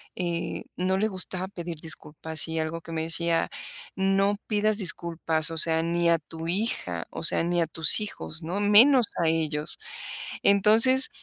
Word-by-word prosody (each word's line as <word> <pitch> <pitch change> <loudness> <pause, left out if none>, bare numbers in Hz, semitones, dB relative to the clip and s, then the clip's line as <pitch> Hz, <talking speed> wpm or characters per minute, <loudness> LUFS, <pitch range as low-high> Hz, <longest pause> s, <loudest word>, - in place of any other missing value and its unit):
eh, 170 -2 -5
no 185 +1 -2
le 215 +3 0
gustaba 185 -1 0
pedir 170 -3 -8
disculpas, 160 0 -2
y 160 - -4
algo 160 +1 -5
que 165 - -12
me 160 -1 -4
decía: 165 0 +1 0.5
"No 195 +1 0
pidas 215 0 0
disculpas, 165 -4 0
o 165 - -6
sea, 160 0 +2
ni 170 0 -1
a 170 - +3
tu 165 +1 -9
hija, 215 +6 -4
o - - -8
sea, - - +6
ni 175 0 -1
a 165 - -1
tus 160 +5 +6
hijos", 175 -5 -8
¿no?, 175 +5 -5
menos 225 +4 +4
a - - 0
ellos. 155 -2 -1 0.6
Entonces, 225 +6 +4
170 Hz, 165 wpm, -25 LUFS, 160-200 Hz, 0.6 s, sea